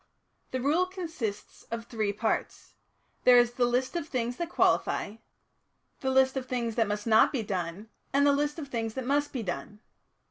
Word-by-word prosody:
"The 260 - -2
Rule 310 +8 +2
consists 320 - -5
of 230 0 -4
three 215 -4 -1
parts; 215 +2 -2 0.5
there 250 -1 +7
is 240 0 +5
the 245 0 +2
list 255 +5 0
of 335 -3 -2
things 245 -3 -2
that 340 -1 -3
qualify, 215 - +1 0.8
the 265 - -1
list 265 0 +4
of 260 -1 -3
things 240 -3 -2
that 225 -1 +1
must 210 0 -3
not 220 -1 +5
be 255 -6 -1
done, 185 +1 -4 0.2
and 280 +1 +3
the 285 - +5
list 295 +2 0
of 305 -3 -5
things 225 -4 -3
that 260 -2 -3
must 290 +2 +1
be 250 -4 -3
done. 205 +3 -5
245 Hz, 185 wpm, -29 LUFS, 220-280 Hz, 0.8 s, there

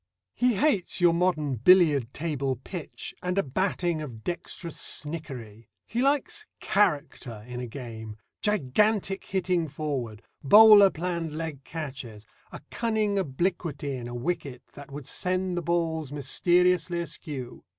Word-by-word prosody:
He 245 -2 +2
hates 210 - +1
your 175 -1 +5
modern 160 -6 +1
billiard 145 - +5
table 140 -4 -2
pitch, 155 +6 -7
and 180 +1 -2
a 195 - +3
batting 175 +2 -1
of 120 -7 -8
dexterous 170 -1 -5
snickery. 130 -9 -6 0.2
He 235 - -2
likes 295 +11 0
"character" 145 - 0
in 125 0 -6
a 125 - -4
game, 110 -3 -8 0.2
gigantic 210 - +1
hitting 180 -3 0
forward, 135 -8 -4 0.2
bowler 205 +5 +9
planned 170 -2 -3
leg 160 -4 -5
catches, 130 -9 -7 0.3
a - - -9
cunning 215 -3 0
obliquity 150 -3 -2
in 120 -2 -6
a 120 - -6
wicket 135 -2 -3
that 145 -1 -11
would 140 -1 -8
send 185 +3 -1
the 175 - -1
balls 160 -3 -1
mysteriously 175 +4 +2
askew. 150 -6 -6
160 Hz, 130 wpm, -27 LUFS, 135-185 Hz, 0.3 s, bowler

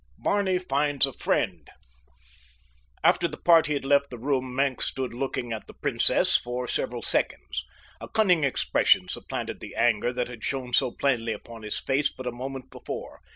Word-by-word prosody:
BARNEY 200 -2 +1
FINDS 145 -5 +2
A 135 - -6
FRIEND 90 -12 -1 1.3
After - - +4
the - - -8
party 165 -3 +5
had 140 -2 -2
left 140 0 +3
the 125 - -7
room 130 0 -1
Maenck 135 -1 +1
stood 130 -3 -2
looking 120 -2 -3
at 110 - -6
the - - -13
princess - - +2
for 125 +1 0
several 120 -1 -2
seconds. - - -1 0.4
A - - -8
cunning 180 -8 +3
expression 140 - +3
supplanted - - -4
the - - -9
anger 120 0 +2
that 125 -1 -2
had 120 -3 -10
shown 130 -3 -3
so 125 - +4
plainly 120 -3 0
upon 115 +2 -10
his 105 0 -3
face 140 +2 +1
but 130 - -10
a 125 - -1
moment 130 +2 -7
before. - - -7
130 Hz, 170 wpm, -27 LUFS, 120-140 Hz, 1.3 s, party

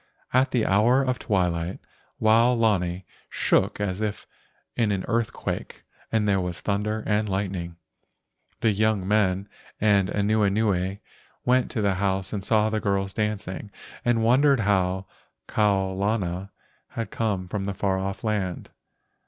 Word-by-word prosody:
At 130 +2 +4
the 125 -4 +1
hour 115 +7 +4
of 130 -1 -1
twilight 90 -4 0 0.4
Wao 115 +3 +5
lani 95 -5 +1 0.2
shook - - +1
as 100 -1 -2
if 105 -2 -3 0.5
in 115 -3 +1
an 95 -2 -1
earthquake, 115 -1 -3 0.3
and 110 -2 +1
there 100 -2 +2
was 90 -2 -4
thunder 105 +2 -1
and 105 0 +1
lightning. 95 -3 -3 0.9
The 110 - +3
young 105 -2 +1
men 100 -2 +2 0.3
and 100 -3 +3
Anuenue 100 -2 +1 0.5
went 125 0 +3
to 110 - -2
the 100 -1 +3
house 95 0 0
and 100 -2 -3
saw 110 +1 +2
the 110 - 0
girls 100 -1 -1
dancing, 105 -2 -3 0.3
and 120 -2 +2
wondered 135 +2 +4
how 95 -2 +1 0.4
Kau 100 -3 +1
lana 95 -1 -2 0.4
had 115 -3 -5
come 100 -5 -1
from 100 +1 -3
the 100 -1 -3
far 95 -1 0
off 95 +3 -4
land. 100 -5 -2
100 Hz, 140 wpm, -25 LUFS, 95-110 Hz, 0.9 s, Wao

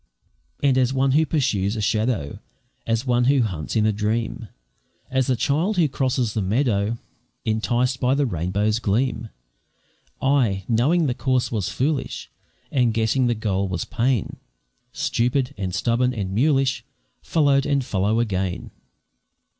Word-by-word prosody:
And 135 -2 +4
as 130 -1 +2
one 135 0 +2
who 155 +3 +3
pursues 115 - 0
a - - -3
shadow, 105 - -1 0.5
As 115 +2 0
one 120 -1 +2
who 135 -1 +4
hunts 90 -6 -4
in 110 -1 +3
a 110 - +3
dream, 110 +2 -2 0.6
As 130 -1 +1
the 130 - +2
child 155 - 0
who 165 -3 +4
crosses 130 -4 -1
the 110 - -1
meadow, 110 +1 0 0.5
Enticed 120 +3 0
by 130 +1 +2
the 145 0 +2
rainbow's 100 +2 0
gleam, 115 +1 -1 0.9
I 120 -9 +1
knowing 140 +9 +2
the 130 - +1
course 130 -1 0
was 105 -6 -1
foolish, 140 +2 -2 0.4
And 120 -4 +2
guessing 115 +3 +2
the 120 - +1
goal 100 -3 -1
was 90 -3 -3
pain, 125 -3 -1 0.5
Stupid, 125 +2 0
and 95 -3 -3
stubborn, 125 +4 +1
and 95 -3 -3
mulish 135 0 +2 0.4
Followed 140 -4 +2
and 140 -3 +1
follow 105 +2 0
again. 95 -5 -2
120 Hz, 145 wpm, -23 LUFS, 105-135 Hz, 0.9 s, And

